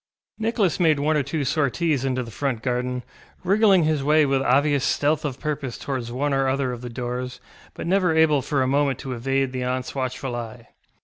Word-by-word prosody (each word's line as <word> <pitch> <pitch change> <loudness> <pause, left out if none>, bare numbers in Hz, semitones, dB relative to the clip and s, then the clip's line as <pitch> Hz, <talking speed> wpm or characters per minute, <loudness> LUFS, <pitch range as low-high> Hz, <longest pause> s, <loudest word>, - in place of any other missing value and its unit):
Nicholas 220 -6 +1
made 160 -4 +3
one 155 +2 +1
or 150 - +3
two 140 +1 -2
sorties 150 0 0
into 130 -1 -1
the 115 - -9
front 130 -2 -2
garden, 125 0 -2 0.4
wriggling 195 -1 +4
his 155 -2 +1
way 150 +1 +4
with 135 -1 +1
obvious 140 +2 +2
stealth 150 +3 +1
of 135 -4 -4
purpose 145 -5 -3
towards 130 -4 -4
one 140 +3 -1
or 135 0 +2
other 130 -1 0
of 120 -1 -6
the 125 - -6
doors, 125 +1 -4 0.4
but - - -6
never 185 0 +2
able 155 -3 +4
for 135 0 0
a - - 0
moment 140 -1 +1
to 130 - -5
evade 135 +2 0
the 130 -1 -4
auntŌĆÖs 125 0 -2
watchful 130 -1 -3
eye. 115 0 -7
135 Hz, 200 wpm, -23 LUFS, 125-150 Hz, 0.4 s, wriggling